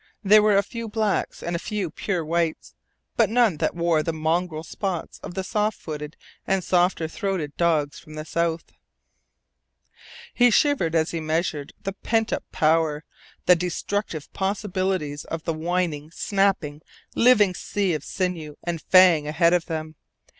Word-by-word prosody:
There 210 +2 +7
were 210 -1 +4
a 200 - +4
few 230 +2 -6
blacks, 215 -2 -1
and 170 0 -2
a - - -1
few 200 -4 -3
pure 175 -1 -2
whites, 160 - -1 0.4
but - - +4
none 225 -7 +3
that - - -1
wore 170 -2 +2
the 165 - -2
mongrel 160 +1 -1
spots 180 +1 -4
of - - -8
the 190 - -2
soft 210 +3 -1
footed 150 -1 -7 0.3
and 195 -1 +1
softer 175 -2 +2
throated 180 -5 -3
dogs 155 -4 +1
from 155 - -13
the 155 0 -6
south. 170 0 -2 1.6
He 245 0 +5
shivered 225 - +2
as 160 0 +2
he 165 - -3
measured 155 -2 -2
the 195 -1 -3
pent 225 +2 0
up - - -2
power, 155 -1 +2 0.4
the 180 - +7
destructive 180 -1 -3
possibilites 190 -6 -2
of 165 -1 -5
the 165 - -1
whining, 160 -2 -2
snapping, 185 -5 0 0.3
living 215 -6 +5
sea 195 0 -1
of 150 -2 -3
sinew 170 -5 -3
and 170 -2 -3
fang 180 -5 +5
ahead 170 +3 +3
of 175 -1 +1
them. 155 -1 -4
170 Hz, 155 wpm, -24 LUFS, 155-195 Hz, 1.6 s, There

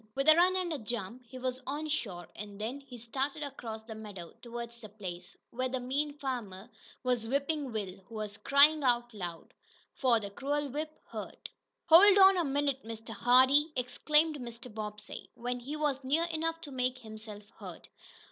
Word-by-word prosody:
With 275 +2 0
a 310 - +10
run 360 +2 +5
and 360 -3 0
a 295 - -3
jump 235 +2 -5
he 260 - -9
was 255 0 -3
on 295 +3 -2
shore, 200 - -3
and 205 -1 -8
then 235 +6 -3
he 270 -3 -11
started 270 +6 -3
across 230 -6 -6
the 220 0 -8
meadow 205 -6 -9
toward 235 -1 -6
the 230 -2 -12
place 185 -4 -8
where 255 +2 -1
the 260 0 -2
mean 285 +4 -1
farmer 240 -6 -5 0.3
was 245 -3 0
whipping 280 +1 -1
Will, 200 -4 -4
who 230 - -11
was 210 -1 -4
crying 290 +4 +5
out 240 -2 +2
loud. 175 -5 -7 0.4
For 245 -4 +3
the 200 -2 -6
cruel 285 +6 -2
whip 305 +4 -3 0.2
hurt. - - -7 0.3
"Hold 390 +5 +9
on 385 0 +8
a 350 - +2
minute, 280 -2 0
Mr. 225 0 -8
Hardee!" 260 +5 +5
exclaimed 300 +5 +2
Mr. 235 -1 -7
Bobbsey, 210 -1 -7
when 245 +1 -3
he 275 +5 -5
was 290 -3 0
near 290 +6 +2
enough 330 +1 -1
to 290 - -9
make 255 -1 0
himself 215 -3 -10 0.2
heard. - - -9
250 Hz, 180 wpm, -31 LUFS, 220-290 Hz, 0.4 s, a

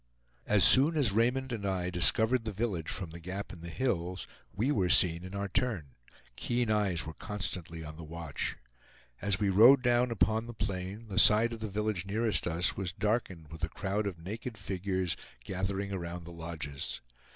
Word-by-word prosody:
As 105 -2 +4
soon 150 +5 +6
as 130 -8 +4
Raymond 125 +5 +1
and 115 -4 -4
I 95 -2 -1
discovered 110 +7 +3
the 110 - -3
village 100 -6 -2
from 90 -5 -4
the 85 - -9
gap 95 +4 -6
in 85 - -12
the 85 - -7
hills, 90 -6 -2 0.3
we 120 +8 0
were 95 -9 +1
seen 85 -1 +5
in 95 +2 -8
our 100 0 -2
turn; 100 - -2 0.4
keen 120 - -1
eyes 100 -5 +1
were 80 - -6
constantly 90 -6 -4
on 75 0 -9
the 85 - -8
watch. 80 -2 -4 0.6
As 100 -1 +1
we 105 -2 +1
rode 125 +7 +7
down 120 0 +3
upon 110 0 +1
the 120 - -8
plain 100 +2 -4
the 95 -3 0
side 115 +3 +5
of 115 - -7
the 110 - -4
village 105 -2 -2
nearest 105 -4 +1
us 85 +2 +1
was 95 -2 -3
darkened 95 -5 -2
with 80 - -10
a 80 - 0
crowd 100 +3 -2
of 95 -4 -4
naked 110 +7 -6
figures 95 -1 -2 0.3
gathering 95 +3 -3
around 85 -2 -5
the 85 - -10
lodges. 80 -4 -6
100 Hz, 185 wpm, -31 LUFS, 85-110 Hz, 0.6 s, rode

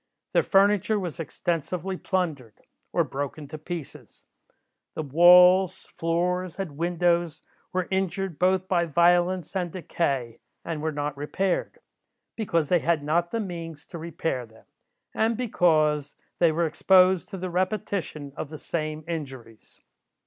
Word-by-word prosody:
Their - - +5
furniture 205 +1 +3
was 175 -5 -5
extensively 175 +4 -3
plundered, 160 - -3 0.3
or - - +2
broken 145 +2 -5
to 155 - -7
pieces. 165 -2 -8 0.7
The 155 - -3
walls, 180 +5 +6
floors, 180 +2 -1
and 185 -7 -5
windows 170 -1 0 0.3
were 185 -1 -1
injured 190 -2 -2
both 185 0 +2
by 175 -2 +2
violence 175 +2 +2
and 180 -3 -1
decay, 140 -9 -2 0.3
and 160 -3 -4
were 160 0 -1
not 145 -1 -3
repaired, 180 - -2 0.6
because 170 -9 0
they 180 - +4
had 165 -2 0
not 170 +4 +1
the 230 - -2
means 165 -6 -6
to 170 - -9
repair 160 -6 -3
them, 110 0 -20 0.5
and 225 0 +1
because 155 - +1 0.2
they 170 -2 +5
were 170 +2 +1
exposed 185 +3 +4
to 195 - -6
the 185 0 -4
repetition 180 -6 -2
of 150 - -5
the 155 - -8
same 155 -1 -4
injuries. 130 -9 -8
170 Hz, 135 wpm, -26 LUFS, 155-185 Hz, 0.7 s, walls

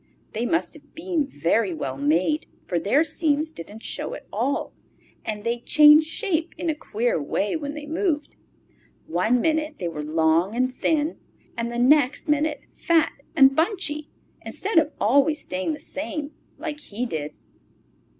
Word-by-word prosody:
They 230 +3 -1
must 330 - 0
have 295 -1 -15
been 325 -3 -1
very 175 - 0
well 135 -4 -4
made, 165 - +1 0.2
for 175 - -1
their 215 - +3
seams 310 -1 0
didn't 210 - -10
show - - -4
at - - -11
all, 245 +7 -1 0.5
and 210 -1 -4
they 235 +1 -1
changed 300 +4 +7
shape 335 -2 -2
in 335 - 0
a - - -1
queer 235 - -1
way 195 - -1
when 290 -2 -4
they 300 -1 -7
moved; 310 -1 -1 0.7
one 200 +9 +1
minute 310 +2 0
they 175 - -3
were 155 -3 -4
long 160 +6 +2
and 255 +1 +1
thin 310 +4 0 0.4
and 235 0 -3
the 240 - -4
next 275 +4 +3
minute 300 0 +1
fat 330 -2 +2 0.2
and 270 -3 +6
bunchy, 320 -4 0 0.3
instead 390 -4 +1
of 310 -1 0
always 285 +7 +3
staying 185 - -2
the - - -13
same 295 0 -5 0.3
like 300 0 -5
he 240 -3 -4
did. 150 -9 -4
285 Hz, 160 wpm, -24 LUFS, 210-310 Hz, 0.7 s, changed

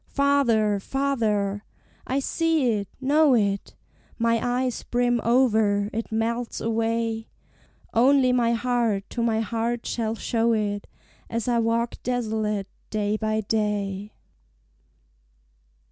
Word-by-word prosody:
Farther, 240 -8 +2
farther 215 -6 -1 0.4
I 265 +2 0
see 320 -4 +1
it 205 -2 -2
know 285 +1 +4
it 200 -3 0 0.4
My 230 0 +2
eyes 250 0 -1
brim 245 -1 0
over, 220 -4 +2
it 225 +1 -4
melts 230 +2 -1
away: 225 0 -1 0.7
Only 255 +1 +4
my 235 -2 +2
heart 230 -4 0
to 240 - -2
my 225 -1 +1
heart 230 +1 -2
shall 225 -1 -2
show 230 0 +1
it, 205 -2 -2 0.4
As 230 0 -3
I 240 -1 +2
walk 230 +1 0
desolate 220 -4 -1 0.2
day 210 -1 0
by 215 0 -1
day. 205 -1 -2
230 Hz, 115 wpm, -25 LUFS, 215-245 Hz, 0.7 s, know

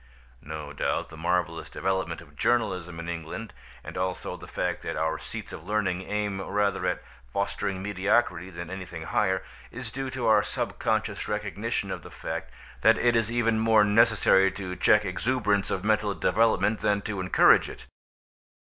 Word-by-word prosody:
No 75 0 -7
doubt - - -1
the 80 - -10
marvellous 85 0 -1
development 95 -3 -2
of 75 -3 -17
journalism 90 -6 0
in 85 - -6
England, 85 +6 -5 0.3
as - - -8
also 90 0 -2
the - - -11
fact - - -2
that - - -4
our 80 0 0
seats - - -7
of 75 - -8
learning 95 -2 0
aim 105 -2 -1
rather 100 -2 0
at 90 - -1 0.3
fostering 100 0 -2
mediocrity 95 -2 +1
than 85 -1 -7
anything 90 -4 -6
higher, 95 +1 +1 0.3
is 120 -2 -7
due 135 +1 -4
to 130 -2 -3
our 110 -2 +6
subconscious - - -2
recognition 105 0 -2
of - - -4
the - - -11
fact - - -5 0.3
that - - +6
it 120 -1 +3
is 115 -1 +1
even 115 -2 +2
more 110 -1 +5
necessary 105 -3 +5
to 95 -2 -5
check 105 +2 +4
exuberance 105 +1 +1
of 95 - -2
mental 105 -2 +2
development 110 +2 +2
than 105 -1 +1
to 100 -3 -3
encourage 90 -1 +5
it. - - -10
100 Hz, 165 wpm, -27 LUFS, 90-110 Hz, 0.3 s, our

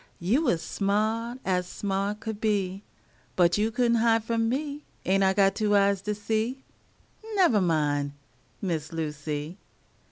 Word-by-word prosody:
You 210 - +2
was 175 - +1
sma't 220 +5 -1
ez 180 -1 0
sma't 200 +2 -2
could 220 -2 -5
be, 195 -3 0 0.5
But 175 +1 +3
you 215 +1 +2
could 240 +1 +1
n't 235 - +3
hide 225 -1 +3
from 225 0 0
me. 290 +3 -3 0.2
Ain't 195 +1 +3
I 190 0 +4
got 195 -1 +4
two 210 -2 +1
eyes 200 -1 +3
to 210 +1 -2
see? 220 +5 -2 0.7
Nevah 340 - +4
min', 145 -4 +1 0.5
Miss 160 -5 -2
Lucy. 150 +1 -4
205 Hz, 150 wpm, -27 LUFS, 180-225 Hz, 0.7 s, I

